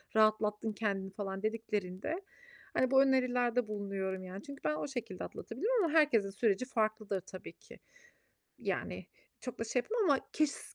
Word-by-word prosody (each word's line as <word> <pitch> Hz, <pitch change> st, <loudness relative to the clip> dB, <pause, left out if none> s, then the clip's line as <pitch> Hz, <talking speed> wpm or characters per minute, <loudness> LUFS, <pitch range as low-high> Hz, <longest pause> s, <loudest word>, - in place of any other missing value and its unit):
rahatlattın 215 Hz, 0 st, +3 dB
kendini?" 195 Hz, -3 st, -1 dB
falan 195 Hz, 0 st, -4 dB
dediklerinde, 215 Hz, -, -2 dB, 0.5 s
hani, 255 Hz, 0 st, +2 dB
bu 265 Hz, 0 st, +8 dB
önerilerde 250 Hz, -3 st, +3 dB
bulunuyorum 195 Hz, -2 st, -2 dB
yani. 185 Hz, +2 st, -7 dB
Çünkü 280 Hz, -7 st, -9 dB
ben 150 Hz, 0 st, +2 dB
o 155 Hz, -, -2 dB
şekilde 240 Hz, -9 st, -4 dB
atlatabilirim 425 Hz, -, 0 dB
ama 325 Hz, -2 st, +1 dB
herkesin 280 Hz, -11 st, +5 dB
süreci 210 Hz, +3 st, +1 dB
farklıdır 215 Hz, -5 st, 0 dB
tabii 185 Hz, 0 st, -9 dB
ki. -, -, -15 dB, 0.8 s
Yani -, -, -2 dB, 0.3 s
çok 250 Hz, -, -6 dB
da 230 Hz, -, -1 dB
şey 245 Hz, +3 st, +1 dB
yapmam 445 Hz, -1 st, 0 dB
ama 275 Hz, -, +5 dB
kes 305 Hz, -2 st, 0 dB
220 Hz, 150 wpm, -34 LUFS, 195-260 Hz, 0.8 s, bu